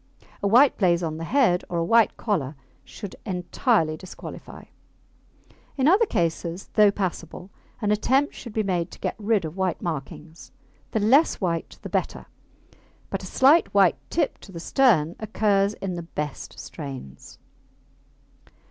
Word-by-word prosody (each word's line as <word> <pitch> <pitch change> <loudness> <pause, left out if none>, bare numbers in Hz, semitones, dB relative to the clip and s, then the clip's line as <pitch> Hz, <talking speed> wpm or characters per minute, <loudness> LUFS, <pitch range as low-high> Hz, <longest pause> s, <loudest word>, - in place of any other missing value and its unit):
A 200 - +1
white 250 +7 +5
blaze 175 -3 +3
on 155 -1 -3
the 165 - -5
head 230 -7 +2
or 175 - -2
a 165 - 0
white 225 +2 +4
collar 160 - -2 0.3
should 200 -3 -9
entirely 180 - 0
disqualify. 180 +3 -10 1.1
In 265 +1 +2
other 405 +7 +5
cases, 170 - -2
though 210 -2 +6
passable, 185 -2 -4 0.3
an 210 - +2
attempt 265 +7 +2
should 235 - -9
be 215 0 -1
made 180 -4 -1
to - - -13
get - - -2
rid 210 -4 +1
of 155 +1 -6
white 185 -3 -1
markings. 160 0 -7 0.4
The 220 - -1
less 260 +10 +4
white 170 -4 -3
the - - -5
better, - - -2 0.9
but - - -2
a - - -7
slight 285 +6 +4
white 195 -4 +4
tip 315 -4 -1
to 195 - -14
the 170 - -7
stern 175 - +3
occurs 205 -1 +1
in 195 -2 -4
the 175 - -4
best 150 -3 -6
strains. 135 - -9
190 Hz, 150 wpm, -24 LUFS, 165-220 Hz, 1.1 s, though